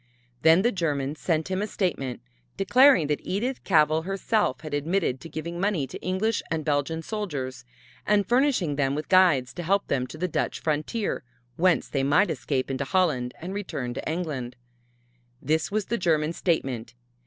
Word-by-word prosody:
Then 165 +4 +6
the 240 - +3
Germans 150 - -2
sent 160 +1 -1
him 185 +1 0
a 210 - -1
statement 140 - -2 0.4
declaring 255 - +5
that 150 0 -1
Edith 240 +8 -2
Cavell 155 -3 +3
herself 195 - 0
had 155 -2 -7
admitted 150 -2 0
giving 165 +4 -6
money 190 -7 +1
to 130 - -9
English 200 +4 0
and 160 -2 -2
Belgian 150 +2 0
soldiers 145 - -4 0.4
and 205 -1 +2
furnishing 245 - +2
them 135 -1 +1
with 150 +1 -5
guides 170 -10 +4
to 175 - -5
help 195 +4 0
them 130 -2 0
to 155 - -10
the 180 +3 -1
Dutch 175 - -2
frontier, 155 +8 -1 0.3
whence 180 +3 +2
they 135 - -1
might 150 +8 +3
escape 135 -2 -2
into 135 +1 -1
Holland 135 -6 0
and 180 +3 -6
return 140 -11 -4
to 135 - -4
England. 150 -8 -4 0.8
This 155 +3 0
was 210 -1 -1
the 235 - -2
German 160 -2 +1
statement. 130 -10 -2
160 Hz, 165 wpm, -26 LUFS, 145-190 Hz, 0.8 s, Then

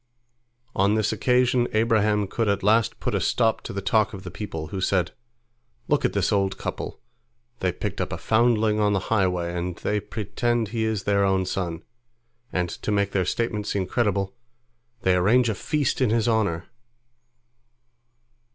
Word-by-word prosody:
On 100 +2 +3
this 110 -1 +1
occasion 125 -1 +2
Abraham 110 -2 +2
could 110 +3 -1
at 100 -1 0
last 110 +2 +3
put - - -2
a - - +1
stop 115 -2 +1
to - - -7
the 100 0 -4
talk 110 +1 +2
of 95 - -9
the - - -7
people, 80 -7 -6
who 95 - -4
said, 90 -2 +1 0.8
"Look - - +2
at - - +1
this - - +1
old 95 -1 +1
couple! - - -5 0.6
They 90 - +1
picked 100 +3 -4
up - - -3
a 85 - -3
foundling 110 +2 +2
on 105 -1 +3
the 100 - +2
highway, 90 -4 +1
and 90 0 -3
they 105 +4 -1
pretend 115 +2 -2
he 110 0 -1
is 110 -3 -1
their 100 -1 +2
own 95 -1 +2
son, 90 -3 -3 0.7
and 90 -1 0
to 105 - -4
make 100 -1 +1
their 95 -2 +1
statement 105 +1 -2
seem 95 -2 -1
credible, 100 -2 0 0.7
they 95 - +4
arrange 115 +7 +4
a - - +1
feast 145 +5 -1
in 130 - +3
his 115 0 +1
honor." 105 -7 +1
105 Hz, 170 wpm, -25 LUFS, 95-110 Hz, 0.8 s, they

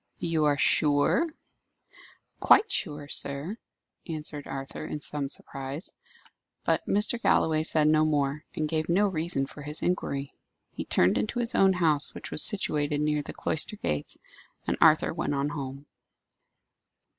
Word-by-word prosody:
"You 165 -2 0
are 145 -1 +2
sure?" 145 - +2 1.1
"Quite 415 +1 +5
sure, 150 - -2
sir," 145 +10 +1 0.5
answered 150 -3 -5
Arthur, 135 +1 -6
in 155 -1 -5
some 145 -1 +1
surprise. 135 +4 -7 0.7
But - - +1
Mr. 210 +4 +1
Galloway 155 -7 +2
said 155 -1 +2
no 155 0 +4
more, 145 -1 0
and 155 - -1
gave 155 +1 -2
no 200 +4 +3
reason 165 -6 -1
for 145 - -11
his 150 +2 -2
inquiry. 140 -6 -2 0.4
He - - -6
turned 90 - +2
into 215 - -3
his 235 -1 +2
own 195 -1 +4
house, 160 -5 +1
which - - -7
was - - +5
situated 150 -7 +1
near 150 0 0
the - - -8
cloister 160 +7 +1
gates, 75 - -2 0.5
and - - 0
Arthur 160 -1 +5
went 160 -3 -2
on 140 +1 -1
home. 140 -1 -6
150 Hz, 145 wpm, -27 LUFS, 145-170 Hz, 1.1 s, Quite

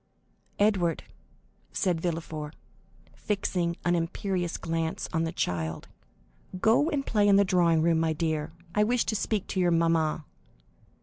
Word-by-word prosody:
"Edward," 195 -5 +2 0.7
said 180 -5 0
Villefort, 160 -3 -4 0.6
fixing 180 -4 -2
an 175 - +3
imperious 175 +1 -1
glance 165 0 -2
on 160 0 +1
the 165 - -2
child, 80 - -3 0.7
"go 230 - +3
and 285 -4 -1
play 210 -2 +2
in 200 - +6
the 200 0 +5
drawing 170 -3 +3
room, 165 -1 +3
my 165 0 +1
dear; 155 -1 -2 0.2
I 210 - +3
wish 240 +2 +1
to 220 - -1
speak 210 -1 -1
to 190 - -2
your 180 -1 +3
mamma." 165 -2 +1
170 Hz, 140 wpm, -28 LUFS, 160-200 Hz, 0.7 s, in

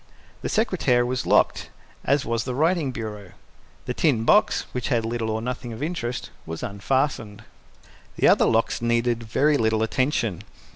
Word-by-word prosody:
The - - -3
secretaire 165 - +2
was 125 +1 -2
locked, - - +2 0.3
as 140 +1 +1
was 115 -1 -1
the 125 0 -4
writing 160 -1 +1
bureau. 105 -5 -7 0.5
The 125 - -2
tin 125 -6 +1
box, 210 - +3
which 125 -2 -3
had 115 -4 0
little 115 -1 -2
or 110 +1 -2
nothing 125 -1 -4
of 110 - -6
interest, 140 -7 -4
was 80 0 -7
unfastened. 110 0 -2 0.7
The - - +3
other - - +5
locks 115 0 +1
needed 120 0 +1
very 145 +7 +2
little 110 -2 +1
attention. 115 - 0
120 Hz, 155 wpm, -24 LUFS, 110-135 Hz, 0.7 s, other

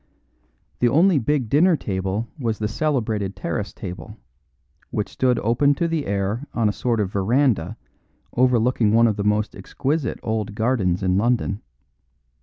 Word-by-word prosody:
The 120 - +3
only 165 +4 +4
big 135 0 0
dinner 160 +7 +4
table 95 +2 -2
was 115 -4 -1
the 105 - -1
celebrated 110 -7 -1
terrace 95 +3 -3
table, 90 -5 -8 0.7
which - - -2
stood 125 -2 +1
open 130 +6 +2
to 170 +1 0
the 165 -3 -2
air 100 +7 -2
on 115 -2 +2
a - - +2
sort 120 0 -1
of 100 -3 -1
veranda 110 - +1 0.6
overlooking 120 -3 +3
one 115 +1 +5
of 110 -3 +2
the 100 - -1
most 105 +1 0
exquisite 135 +7 -2
old 110 -2 -2
gardens 105 -6 0
in 95 +1 +2
London. 110 -3 0
110 Hz, 150 wpm, -22 LUFS, 100-130 Hz, 0.7 s, one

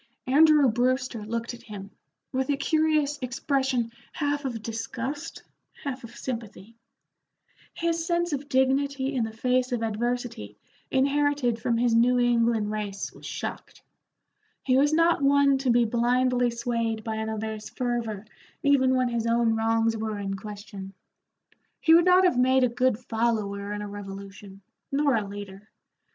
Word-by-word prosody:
Andrew 295 +1 +6
Brewster 250 0 0
looked 230 +2 -3
at 240 - -11
him, 205 -4 -9 0.4
with 265 +1 -1
a 285 - +1
curious 305 -1 +1
expression 260 -2 -1 0.2
half 290 -1 -1
of 230 -5 -4
disgust, 260 +8 -5 0.4
half 260 -2 -4
of 235 0 -11
sympathy. 230 -3 -7 1.0
His 335 -1 -1
sense 345 -1 0
of 285 0 -4
dignity 270 +1 +1
in 250 -4 0
the 220 - -3
face 250 +3 0
of 240 -2 -1
adversity 225 - -3 0.3
inherited 280 -3 +1
from 235 - +1
his 240 0 +2
New 240 +2 +4
England 230 -3 +2
race 205 -2 -4
was - - -11
shocked; - - -6 0.8
he 255 - +2
was 285 +3 +4
not 330 0 +3
one 280 -1 +4
to 265 -1 -1
be 240 0 +4
blindly 245 +2 +2
swayed 230 -2 -2
by 220 0 -3
another's 220 -1 -4
fervor 235 -5 -3 0.4
even 265 -2 +4
when 255 -1 +2
his 235 -1 -1
own 230 -1 +2
wrongs 225 0 +1
were 220 -1 -3
in 195 -1 -3
question. 200 -1 -9 0.8
He 325 - +5
would 340 +1 +6
not 365 +1 +6
have 350 -9 +3
made 260 +1 +4
a 250 - +3
good 250 -1 +1
follower 220 -4 -2
in 210 0 -4
a - - -5
revolution, 195 -1 -9 0.3
nor 280 0 +2
a 210 -3 -1
leader. 200 0 -9
240 Hz, 150 wpm, -26 LUFS, 220-270 Hz, 1.0 s, Andrew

